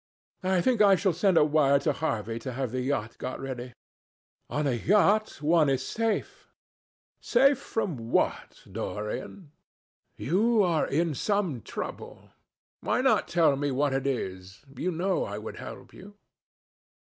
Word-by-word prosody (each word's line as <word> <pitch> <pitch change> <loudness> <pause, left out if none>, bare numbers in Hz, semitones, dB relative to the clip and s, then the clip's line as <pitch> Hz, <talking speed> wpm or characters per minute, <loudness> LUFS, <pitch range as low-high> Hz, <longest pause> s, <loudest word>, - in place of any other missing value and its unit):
I 185 -1 +1
think 245 +1 +2
I 200 -2 +7
shall 190 -1 +1
send 180 +1 +2
a 150 - +6
wire 145 -2 +4
to 140 - 0
Harvey 115 -7 -3
to 130 +2 -6
have 130 -2 -3
the 130 0 -2
yacht 120 -4 -3
got 130 - -5
ready. 125 -2 -6 0.8
On 150 0 -1
a 140 - +2
yacht 205 - +2
one 155 -1 +4
is 130 -1 0
safe." 225 -2 -2 0.7
"Safe 270 +2 +3
from 155 - -4
what, - - -1
Dorian? 125 - -5 0.7
You 210 - +2
are 170 -4 +1
in 160 +3 0
some 185 - -1
trouble. - - -8 0.5
Why - - 0
not - - +2
tell 165 -5 +3
me 145 +1 -1
what 140 +1 0
it 135 +1 -1
is? 95 -5 -5
You 170 +8 -2
know 185 +2 0
I 100 - -5
would 105 +1 -7
help - - -10
you." 205 +2 -13
150 Hz, 150 wpm, -27 LUFS, 130-190 Hz, 0.8 s, I